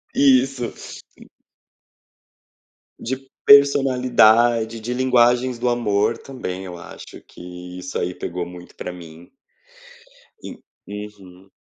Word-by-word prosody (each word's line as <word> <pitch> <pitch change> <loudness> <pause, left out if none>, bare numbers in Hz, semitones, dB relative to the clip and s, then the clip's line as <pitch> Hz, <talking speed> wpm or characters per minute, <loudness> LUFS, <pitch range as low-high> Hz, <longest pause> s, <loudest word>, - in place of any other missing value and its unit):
Isso. 135 -2 +2 0.4
En - - -17 1.7
De 130 +2 -4 0.3
personalidade, 120 -5 +4
de 120 +3 -4
linguagens 125 -1 +2
do 125 - -1
amor 115 -1 0
também 95 -9 -7
eu 90 -2 -8
acho - - -12
que 90 0 -11
isso 90 - -5
aí 90 0 -3
pegou 90 0 -5
muito 90 0 -13
para 90 - -6
mim. 85 -1 -13 1.1
En - - -9 0.3
uhum. 100 -2 -11
110 Hz, 105 wpm, -21 LUFS, 90-125 Hz, 1.7 s, personalidade